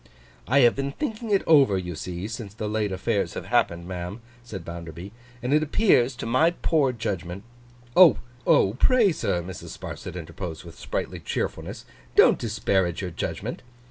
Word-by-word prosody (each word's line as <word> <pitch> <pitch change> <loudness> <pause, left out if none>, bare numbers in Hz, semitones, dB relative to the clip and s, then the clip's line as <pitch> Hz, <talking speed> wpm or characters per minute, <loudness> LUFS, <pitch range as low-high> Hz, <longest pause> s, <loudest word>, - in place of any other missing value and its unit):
'I 140 +4 +4
have 120 -2 +5
been 140 0 -3
thinking 230 - -4
it 200 -2 +3
over, 140 -11 +5
you 90 -1 -4
see, 90 +4 -5
since 110 -2 -7
the 110 -2 -4
late 105 -1 -1
affairs 95 0 -1
have - - -5
happened, 85 0 +1
ma'am,' 90 +3 -5 0.2
said 110 -5 -8
Bounderby; 85 +2 -8 0.3
'and 125 +3 0
it 155 - +4
appears 145 - +3
to - - -6
my 130 +8 +4
poor 155 -5 +1
judgment—' 100 -5 -4 0.5
'Oh! 180 -7 +8 0.6
Pray, 240 -6 +5
sir,' 90 - -1
Mrs. 90 +1 -8
Sparsit - - -7
interposed, 85 -1 -6
with 85 -2 -12
sprightly - - -4
cheerfulness, - - -4 0.3
'don't - - +6
disparage 95 -5 0
your 90 - -4
judgment. - - -4
105 Hz, 160 wpm, -25 LUFS, 90-140 Hz, 0.6 s, Oh